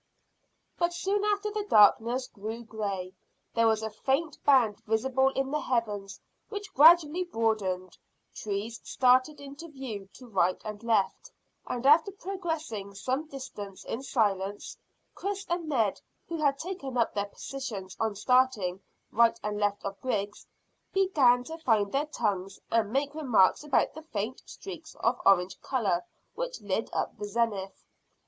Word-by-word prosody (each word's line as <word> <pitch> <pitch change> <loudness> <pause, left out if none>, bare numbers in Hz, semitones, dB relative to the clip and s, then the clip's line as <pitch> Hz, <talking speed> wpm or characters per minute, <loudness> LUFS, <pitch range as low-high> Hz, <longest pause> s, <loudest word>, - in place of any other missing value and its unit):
But 345 0 +1
soon 395 +3 0
after 420 0 0
the 420 0 -2
darkness 230 +5 +5
grew 225 +1 -7
grey, 200 -5 -4 0.4
there 230 -1 +4
was 220 -1 +2
a 220 - -3
faint 275 +8 -1
band 250 -7 +4
visible 260 +5 +1
in 270 0 -1
the 300 - +1
heavens 210 -7 -2 0.3
which 410 -1 -6
gradually 325 +3 +7
broadened, 215 - -1 0.3
trees 215 +2 -4
started 255 +3 +3
into 285 +4 -9
view 250 -10 -7
to 255 - -13
right 185 -5 +1
and 210 -1 -6
left, 230 - 0 0.4
and 245 +1 -3
after 315 +7 +6
progressing 325 - -4
some 260 +9 -2
distance 205 -9 -8
in 230 - -4
silence, 205 -6 -1 0.4
Chris 400 0 -4
and 340 -2 -2
Ned, 225 -9 +1 0.3
who 335 - -3
had 285 -3 +2
taken 320 -7 -5
up 235 - +2
their 200 -1 -1
positions 205 -5 -6
on 220 -2 0
starting 210 -5 +2 0.3
right 230 0 +4
and 210 0 -2
left 205 -1 0
of 200 0 -5
Griggs, 210 -5 -3 0.4
began 285 -11 +4
to 325 +5 -8
find 215 -9 +2
their 285 +2 0
tongues 200 -8 -2
and 220 -2 +2
make 280 +3 0
remarks 250 -9 +3
about 295 -3 +2
the 315 - -9
faint 235 -5 -4
streaks 330 -5 -9
of 240 +2 0
orange 185 -1 +3
colour 205 -10 0 0.3
which - - -4
lit - - -2
up - - -2
the 210 - -3
zenith. 205 -3 -2
240 Hz, 150 wpm, -29 LUFS, 205-300 Hz, 0.4 s, gradually